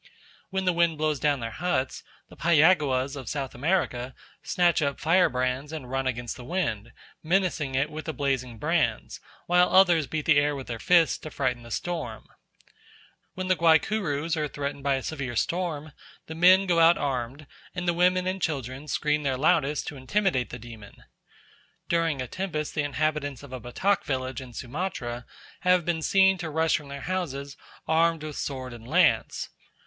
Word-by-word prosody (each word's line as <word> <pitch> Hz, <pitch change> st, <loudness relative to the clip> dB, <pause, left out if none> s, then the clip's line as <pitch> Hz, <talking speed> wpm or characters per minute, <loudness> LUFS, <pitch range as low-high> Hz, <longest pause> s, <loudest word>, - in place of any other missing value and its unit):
When 190 Hz, -1 st, -2 dB
the 180 Hz, -, +3 dB
wind 170 Hz, -2 st, +2 dB
blows 155 Hz, -2 st, 0 dB
down 145 Hz, -1 st, +1 dB
their 115 Hz, 0 st, -4 dB
huts, 160 Hz, -6 st, -2 dB, 0.3 s
the -, -, -15 dB
Payaguas 150 Hz, -5 st, +3 dB
of 130 Hz, -5 st, -7 dB
South 140 Hz, -3 st, -3 dB
America 130 Hz, -4 st, -1 dB, 0.3 s
snatch 175 Hz, -2 st, +2 dB
up 140 Hz, -2 st, -1 dB
firebrands 140 Hz, -5 st, +1 dB
and 140 Hz, -6 st, -7 dB
run 135 Hz, 0 st, -1 dB
against 120 Hz, -2 st, -3 dB
the 125 Hz, -, -9 dB
wind, 120 Hz, -, -2 dB, 0.3 s
menacing 165 Hz, -5 st, 0 dB
it 140 Hz, +3 st, 0 dB
with 155 Hz, +1 st, -6 dB
the 160 Hz, -, -2 dB
blazing 130 Hz, -5 st, -2 dB
brands, -, -, -1 dB, 0.3 s
while 180 Hz, +1 st, +4 dB
others 175 Hz, -6 st, +5 dB
beat 155 Hz, -1 st, -3 dB
the 150 Hz, -3 st, +5 dB
air 145 Hz, 0 st, +1 dB
with 135 Hz, -2 st, -6 dB
their 115 Hz, -1 st, -5 dB
fists 170 Hz, +4 st, +4 dB
to 155 Hz, -, -8 dB
frighten 130 Hz, -4 st, -1 dB
the 120 Hz, -, -12 dB
storm. 150 Hz, -6 st, -4 dB, 1.1 s
When 185 Hz, 0 st, -4 dB
the 185 Hz, -, +3 dB
Guaycurus 165 Hz, -1 st, +2 dB
are 155 Hz, -1 st, -1 dB
threatened 140 Hz, 0 st, -5 dB
by 140 Hz, 0 st, +1 dB
a 135 Hz, -, -4 dB
severe 140 Hz, -6 st, -4 dB
storm, 160 Hz, -1 st, -2 dB, 0.3 s
the 160 Hz, -, -7 dB
men 185 Hz, +4 st, +6 dB
go 175 Hz, -3 st, +2 dB
out 165 Hz, +1 st, +6 dB
armed, 135 Hz, +1 st, -3 dB, 0.3 s
and 180 Hz, -1 st, -3 dB
the 175 Hz, -, +3 dB
women 180 Hz, +1 st, +2 dB
and 185 Hz, +1 st, -2 dB
children 135 Hz, -2 st, -3 dB
scream 150 Hz, 0 st, 0 dB
their 135 Hz, -3 st, -1 dB
loudest 150 Hz, 0 st, +2 dB
to 145 Hz, -, -9 dB
intimidate 130 Hz, 0 st, 0 dB
the -, -, -7 dB
demon. 110 Hz, -3 st, -12 dB, 0.9 s
During 165 Hz, -6 st, +1 dB
a -, -, -7 dB
tempest 155 Hz, -2 st, -4 dB
the 155 Hz, -, 0 dB
inhabitants 145 Hz, -2 st, -2 dB
of 135 Hz, -2 st, -11 dB
a 130 Hz, -, -4 dB
Batak 185 Hz, -, 0 dB
village 130 Hz, -2 st, -3 dB
in 125 Hz, -2 st, -11 dB
Sumatra 125 Hz, -3 st, -4 dB, 0.3 s
have 180 Hz, -2 st, +3 dB
been 170 Hz, -2 st, 0 dB
seen 190 Hz, +2 st, +4 dB
to 170 Hz, -2 st, -4 dB
rush 160 Hz, +1 st, +2 dB
from 150 Hz, -, -11 dB
their 140 Hz, 0 st, -7 dB
houses 140 Hz, -6 st, -3 dB, 0.3 s
armed 165 Hz, 0 st, +2 dB
with 155 Hz, -2 st, -6 dB
sword 130 Hz, -3 st, -4 dB
and 115 Hz, -1 st, -11 dB
lance. -, -, +2 dB
150 Hz, 175 wpm, -26 LUFS, 130-170 Hz, 1.1 s, men